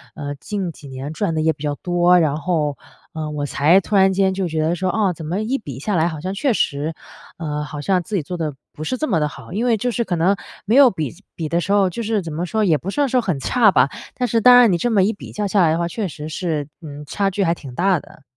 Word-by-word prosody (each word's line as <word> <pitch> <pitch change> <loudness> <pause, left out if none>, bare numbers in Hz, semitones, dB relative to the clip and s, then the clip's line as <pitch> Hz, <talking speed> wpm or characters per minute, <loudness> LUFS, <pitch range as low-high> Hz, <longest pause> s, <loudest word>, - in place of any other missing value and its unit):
呃 150 - -7
呃， 145 0 -4
近 190 +3 -4
几 145 -2 -13
年 135 +2 -6
赚 170 -1 -1
得 155 - 0
也 160 +1 +3
比 150 - -12
较 145 -1 -1
多， 175 +2 +3
然 150 -3 +1
后， 155 -3 -1 0.4
呃， 155 -2 -4
我 145 -1 -3
才 155 +6 +4
突 210 - -3
然 190 -1 +5
间 190 0 +2
就 190 -1 -1
觉 160 -1 -1
得 160 +2 +1
说， 185 +2 -1
哦， 195 +1 +1
怎 160 -1 -9
么 180 +7 -2
一 240 +5 -1
比 140 - -8
下 205 +7 -1
来 165 0 +3
好 160 -3 -4
像 185 +2 -3
确 240 +5 +1
实， 150 -2 -1 0.4
呃， 150 -2 -3
好 150 0 -7
像 185 +2 +1
自 210 - -5
己 180 - +1
做 180 - -5
得 155 -3 -2 0.2
不 155 - -7
是 255 +11 -2
这 310 - -1
么 185 -8 +1
地 150 - +1
好。 150 - -11
因 225 +5 -1
为 235 - +3
就 245 +4 -1
是 235 0 0
可 180 -4 -2
能 180 +5 +3 0.3
没 220 - +2
有 275 -2 +8
比 155 -8 -4 0.2
比 160 - -3
的 170 - +1
时 195 - -3
候 200 -2 +4
就 235 - -5
是 215 -2 0
怎 165 -2 -7
么 165 +4 -2
说？ 220 +4 0
也 160 -4 +3
不 180 - -6
算 285 +7 +1
说 255 0 +2
很 180 -9 -1
差 215 - +4
吧， 130 -2 +4 0.3
但 250 - -1
是 230 0 +2
当 250 +2 +8
然 240 -5 +6
你 175 - +2
这 240 - 0
么 200 -4 +4
一 205 - +2
比 - - -11
较 210 - -3
下 200 0 +2
来 160 -3 +4
的 - - 0
话， 170 0 -1
确 210 +3 -3
实 150 -2 -7
是， 155 -3 -2
嗯， 150 -2 -8
差 195 +6 0
距 195 +1 -1
还 165 - +2
挺 140 -7 -10
大 185 0 +2
的。 - - -18
175 Hz, 315 characters per minute, -20 LUFS, 155-205 Hz, 0.4 s, 有